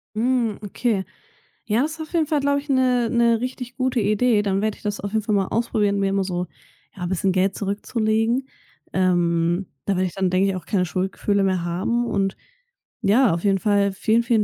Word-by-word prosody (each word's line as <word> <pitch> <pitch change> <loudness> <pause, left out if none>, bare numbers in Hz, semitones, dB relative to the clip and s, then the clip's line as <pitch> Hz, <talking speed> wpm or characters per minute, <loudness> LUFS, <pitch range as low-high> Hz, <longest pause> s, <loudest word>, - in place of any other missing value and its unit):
Hm, 235 -2 +1
okay. 205 -1 -1 0.6
Ja, 220 +2 +1
das 305 +3 -1
ist 325 - -8
auf 315 - -8
jeden 325 -3 +2
Fall, 305 -1 +1
glaube 280 0 +1
ich, 290 +1 -13
'ne 250 -3 +2
'ne 235 -1 +3
richtig 250 -1 -5
gute 255 -1 0
Idee. 215 +1 +2
Dann 195 -1 0
werde 215 0 -1
ich - - -21
das 205 -1 -2
auf 200 - -5
jeden 220 0 0
Fall 210 0 0
mal 195 -2 +1
ausprobieren, 210 -3 0
mir 195 0 +1
immer 195 0 +1
so, 180 -1 -2 0.5
ja, 180 -3 -5
bisschen 190 +1 0
Geld 190 +1 +1
zurückzulegen. 220 +4 0 0.5
Ähm, 175 -1 +1 0.2
da 200 - +1
werde 185 +1 +1
ich 175 - -8
dann, 190 -1 0
denke 185 +2 +2
ich, 195 - -1
auch 185 - -7
keine 190 -4 +1
Schuldgefühle 195 +3 -1
mehr 185 -2 +1
haben. 190 +8 -1
Und 195 -2 0 0.7
ja, 225 +1 +4
auf 170 - -3
jeden 195 -2 +2
Fall 200 0 +2
vielen, 220 +4 +2
vielen 230 -2 +2
205 Hz, 210 wpm, -22 LUFS, 190-235 Hz, 0.7 s, ja